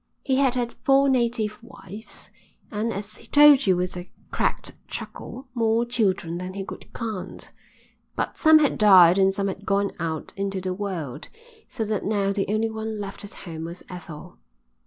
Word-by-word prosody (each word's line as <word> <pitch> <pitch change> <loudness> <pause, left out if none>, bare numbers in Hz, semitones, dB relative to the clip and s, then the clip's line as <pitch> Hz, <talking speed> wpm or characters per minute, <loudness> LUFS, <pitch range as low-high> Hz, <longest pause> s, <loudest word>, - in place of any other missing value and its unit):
He 265 -2 +1
had 265 -2 +3
had 240 -1 -1
four 275 0 +4
native 235 -4 0
wives 220 -3 -9 0.4
and, 220 +1 -1
as 205 0 -6
he - - -13
told 290 -4 +7
you 185 -2 +4
with 180 0 -2
a 180 0 -7 0.2
cracked - - -1
chuckle, 265 +1 -7
more 230 -1 +2
children 190 -8 0
than 185 +1 -6
he 195 -1 -4
could - - -10
count. 220 -6 -6 0.6
But - - -2
some 315 -1 +6
had 300 -3 +2
died 190 -3 +7
and 190 0 +5
some 195 0 -2
had 195 +1 -5
gone 200 0 +1
out 160 -2 -4
into 195 -1 -2
the 185 0 -3
world, 175 -8 -5 0.4
so 225 -4 -3
that 215 -1 -2
now 200 -1 0
the 195 -1 -1
only 220 +1 0
one 220 -1 -4
left 195 0 -7
at 205 - -10
home 165 -2 -6
was 170 +2 -8
Ethel. 175 -4 -10
205 Hz, 180 wpm, -24 LUFS, 185-230 Hz, 0.6 s, told